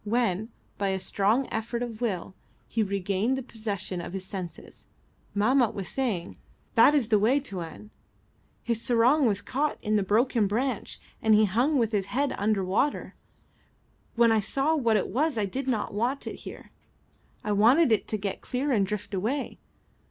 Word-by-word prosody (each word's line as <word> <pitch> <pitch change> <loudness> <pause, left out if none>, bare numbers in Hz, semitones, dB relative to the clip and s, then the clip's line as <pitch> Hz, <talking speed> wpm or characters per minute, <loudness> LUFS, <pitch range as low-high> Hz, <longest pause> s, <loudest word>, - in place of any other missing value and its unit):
When, 215 -2 0 0.3
by 200 - +1
a 190 0 -1
strong 210 +7 +1
effort 230 +2 -2
of 235 -2 -7
will, 190 -6 -2 0.3
he 230 - -1
regained 200 +4 0
the 265 - -4
possession 205 -6 -4
of 170 - -7
his 190 -1 -5
senses, 185 -3 -8 0.5
Mahmat 240 +3 +3
was 195 -3 -4
saying 220 -10 -2 0.4
"That 255 +6 +6
is 250 -6 +1
the 215 -2 +4
way, 240 +7 +3
Tuan. 195 - -8 0.7
His 235 -1 -1
sarong 250 +5 +4
was 205 -2 0
caught 290 +3 -1
in 215 0 0
the - - +2
broken 220 +2 +2
branch, 235 +3 -2 0.2
and 220 -1 +5
he 215 +1 +5
hung 245 +10 +1
with 230 -3 +1
his 200 -3 0
head 280 +2 0
under 205 -2 +1
water. 215 +10 0 1.0
When 235 -1 +5
I 220 - +4
saw 275 +9 0
what 235 -7 +2
it 195 - -1
was 295 +2 0
I 210 - +1
did 265 +7 -4
not 225 -6 -1
want 240 +7 -1
it - - -5
here. - - -10 0.7
I 210 - -2
wanted 235 +8 +5
it 220 - +2
to 215 - -2
get 200 -1 -4
clear 265 +3 -2
and 200 -6 +2
drift 205 0 -5
away. 225 +9 -2
220 Hz, 175 wpm, -27 LUFS, 200-250 Hz, 1.0 s, That